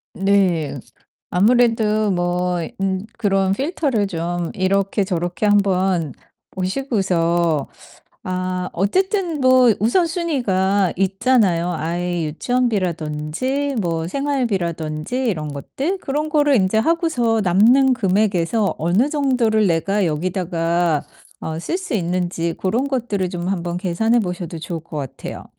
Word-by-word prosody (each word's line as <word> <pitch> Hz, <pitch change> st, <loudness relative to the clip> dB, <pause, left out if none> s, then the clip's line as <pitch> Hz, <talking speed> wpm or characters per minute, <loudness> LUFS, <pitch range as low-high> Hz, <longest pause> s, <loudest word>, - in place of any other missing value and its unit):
네. 190 Hz, -6 st, +1 dB, 0.5 s
아무래도 215 Hz, 0 st, +3 dB
뭐 175 Hz, 0 st, 0 dB, 0.2 s
음 190 Hz, 0 st, -1 dB
그런 195 Hz, -3 st, +1 dB
필터를 270 Hz, -, 0 dB
좀 175 Hz, -1 st, -3 dB
이렇게 195 Hz, +1 st, +1 dB
저렇게 175 Hz, 0 st, -2 dB
한번 190 Hz, -6 st, +2 dB, 0.4 s
보시고서 180 Hz, -, 0 dB, 0.6 s
아 185 Hz, 0 st, -2 dB
어쨌든 350 Hz, -, 0 dB
뭐 255 Hz, -2 st, +5 dB
우선순위가 230 Hz, -, +1 dB
있잖아요 195 Hz, -2 st, +2 dB
아이 175 Hz, +1 st, -2 dB
유치원비라든지 200 Hz, -, -1 dB
뭐 165 Hz, -3 st, -2 dB
생활비라든지 190 Hz, -, -2 dB
이런 155 Hz, -8 st, -2 dB
것들. 280 Hz, -, -3 dB
그런 300 Hz, 0 st, -2 dB
거를 295 Hz, -3 st, +3 dB
인제 190 Hz, +2 st, +2 dB
하고서 245 Hz, -6 st, +1 dB
남는 235 Hz, +9 st, +4 dB
금액에서 200 Hz, -1 st, +1 dB
어느 180 Hz, -, +2 dB
정도를 250 Hz, -8 st, +2 dB
내가 190 Hz, +4 st, +1 dB
여기다가 170 Hz, -1 st, 0 dB, 0.4 s
어 160 Hz, 0 st, -4 dB
쓸 350 Hz, -, -2 dB
수 370 Hz, -8 st, -5 dB
있는지 175 Hz, -3 st, -1 dB
고런 235 Hz, +9 st, -1 dB
것들을 225 Hz, -8 st, -1 dB
좀 175 Hz, -1 st, -4 dB
한번 175 Hz, -2 st, -2 dB
계산해 195 Hz, +6 st, +1 dB
보셔도 180 Hz, -3 st, -4 dB
좋을 165 Hz, 0 st, -5 dB
것 160 Hz, -1 st, -9 dB
같아요. 135 Hz, -4 st, -6 dB
195 Hz, 260 characters per minute, -20 LUFS, 175-240 Hz, 0.6 s, 뭐